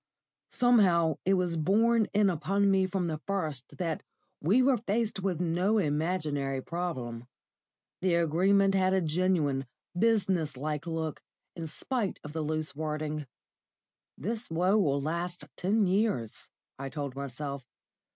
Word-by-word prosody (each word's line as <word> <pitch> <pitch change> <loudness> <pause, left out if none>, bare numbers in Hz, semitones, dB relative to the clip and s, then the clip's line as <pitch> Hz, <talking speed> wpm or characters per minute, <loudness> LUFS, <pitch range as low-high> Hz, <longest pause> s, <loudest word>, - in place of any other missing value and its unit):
Somehow 180 - +4
it 195 +1 +4
was 180 -2 0
borne 220 +7 +3
in 205 -1 +3
upon 195 +4 +1
me 190 -1 +3
from 185 -1 -1
the 155 -2 -2
first 155 -10 -3
that 165 -4 -2 0.4
we 205 - +4
were 260 -1 +4
faced 220 0 -1
with 185 -3 -1
no 180 +5 +1
imaginary 150 -5 0
problem. 130 -8 -4 0.7
The 180 -2 +2
Agreement 190 +4 +3
had 190 0 +3
a 190 - +2
genuine, 155 -5 +1 0.3
business 185 - +1
like 150 +3 -3
look, 160 -2 -3 0.3
in 165 -1 -5
spite 230 - -2
of 150 - -8
the 160 - -2
loose 155 -1 -2
wording. 155 -1 -3 0.9
"This 225 - -4
woe 180 +5 +2
will 140 -9 +2
last 170 +1 -2
ten 205 +3 +2
years," 185 - 0 0.3
I 135 0 -4
told 140 -1 -5
myself. 140 0 -4
170 Hz, 135 wpm, -30 LUFS, 150-195 Hz, 0.9 s, Somehow